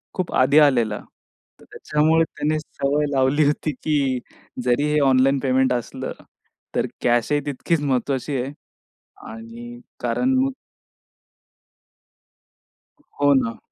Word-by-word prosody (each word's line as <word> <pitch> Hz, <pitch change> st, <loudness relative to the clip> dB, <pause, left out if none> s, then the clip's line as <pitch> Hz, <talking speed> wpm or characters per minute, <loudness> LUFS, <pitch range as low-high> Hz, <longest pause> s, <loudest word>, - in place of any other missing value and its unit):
खूप 185 Hz, -3 st, -3 dB
आधी 140 Hz, +4 st, +5 dB
आलेला. 120 Hz, -8 st, +3 dB, 0.6 s
तर -, -, -18 dB
त्याच्यामुळे 155 Hz, +2 st, +2 dB
त्याने 155 Hz, 0 st, -2 dB
सवय 145 Hz, -1 st, -1 dB
लावली 135 Hz, +2 st, +2 dB
होती, 150 Hz, +1 st, 0 dB
की 140 Hz, -2 st, -1 dB, 0.4 s
जरी 125 Hz, +3 st, +2 dB
हे 150 Hz, -, +3 dB
ऑनलाईन 135 Hz, +1 st, +3 dB
पेमेंट 130 Hz, -1 st, +2 dB
असलं 120 Hz, -2 st, -4 dB, 0.6 s
तर -, -, +1 dB, 0.2 s
कॅशही 120 Hz, +4 st, +2 dB
तितकीच 145 Hz, +3 st, -1 dB
महत्त्वाची 135 Hz, 0 st, -1 dB
आहे 130 Hz, +3 st, -5 dB, 0.8 s
आणि 115 Hz, +2 st, -10 dB, 0.2 s
कारण 185 Hz, -, 0 dB
मग 270 Hz, +1 st, +1 dB, 2.7 s
हो, 145 Hz, 0 st, +5 dB
ना. 115 Hz, -4 st, 0 dB
135 Hz, 110 wpm, -22 LUFS, 125-150 Hz, 2.7 s, आधी